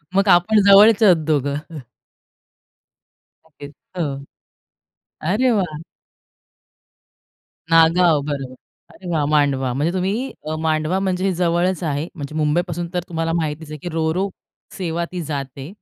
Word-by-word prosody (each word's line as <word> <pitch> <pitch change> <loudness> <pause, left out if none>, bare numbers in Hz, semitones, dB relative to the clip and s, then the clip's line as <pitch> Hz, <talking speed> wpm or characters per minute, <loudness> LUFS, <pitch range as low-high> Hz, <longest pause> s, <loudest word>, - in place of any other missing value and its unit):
मग 200 +1 +3
आपण 205 +5 +5
जवळचे 210 +2 +7
आहोत 180 -4 +6
दोघं. 150 +1 -2 1.7
ओके. 145 -2 -12
हो. 145 -2 -6 1.1
अरे 250 +4 +2
वाह! 180 -8 -1 1.9
नागाव, 165 -1 +5
बरोबर. 135 -3 -4 0.4
अरे 185 - -11
वाह! 155 -4 0
मांडवा. 140 -4 +1
म्हणजे 150 +7 -1
तुम्ही 200 +8 -2 0.3
मांडवा 160 +3 0
म्हणजे 190 0 0
जवळच 175 +1 0
आहे. 150 +2 -2
म्हणजे 145 -1 -7
मुंबईपासून 170 +3 -1
तर 180 - +1
तुम्हाला 165 -1 -2
माहितीच 155 -2 -3
आहे 155 - -7
की 175 - -6
रो, 160 -1 0
रो 195 +2 0 0.5
सेवा 170 -2 -2
ती 180 - -4
जाते. 140 -2 -6
165 Hz, 120 wpm, -20 LUFS, 150-180 Hz, 1.9 s, जवळचे